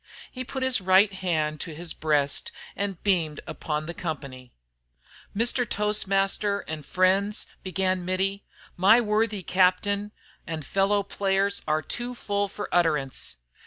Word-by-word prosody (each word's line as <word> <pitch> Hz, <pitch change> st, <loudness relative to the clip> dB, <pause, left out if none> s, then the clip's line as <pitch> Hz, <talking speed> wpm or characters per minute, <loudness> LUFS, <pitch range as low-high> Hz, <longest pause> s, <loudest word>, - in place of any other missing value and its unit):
He 255 Hz, -, -5 dB
put 265 Hz, +1 st, -4 dB
his 260 Hz, -5 st, +2 dB
right 190 Hz, +2 st, +5 dB
hand 155 Hz, -5 st, -1 dB
to 165 Hz, -3 st, -5 dB
his 170 Hz, +1 st, -3 dB
breast 145 Hz, -3 st, +1 dB, 0.2 s
and 200 Hz, -3 st, -3 dB
beamed 165 Hz, -7 st, +1 dB
upon 150 Hz, -1 st, -3 dB
the 170 Hz, -, -5 dB
company. 140 Hz, -7 st, -6 dB, 0.9 s
"Mr. 240 Hz, +3 st, +2 dB
Toastmaster 200 Hz, -1 st, +1 dB
an' 160 Hz, -1 st, -5 dB
friends," 190 Hz, +6 st, +1 dB, 0.2 s
began 185 Hz, 0 st, -1 dB
Mittie, 190 Hz, +2 st, -1 dB, 0.3 s
"my 200 Hz, +6 st, +6 dB
worthy 215 Hz, -3 st, 0 dB
captain 195 Hz, +3 st, +2 dB, 0.4 s
an' 160 Hz, -3 st, -4 dB
fellow 195 Hz, +6 st, +1 dB
players 200 Hz, 0 st, 0 dB
are 155 Hz, 0 st, +1 dB
too 245 Hz, +1 st, -4 dB
full 205 Hz, -3 st, -1 dB
fer 205 Hz, +1 st, -6 dB
utterance. 150 Hz, -6 st, +1 dB
190 Hz, 130 wpm, -26 LUFS, 160-205 Hz, 0.9 s, my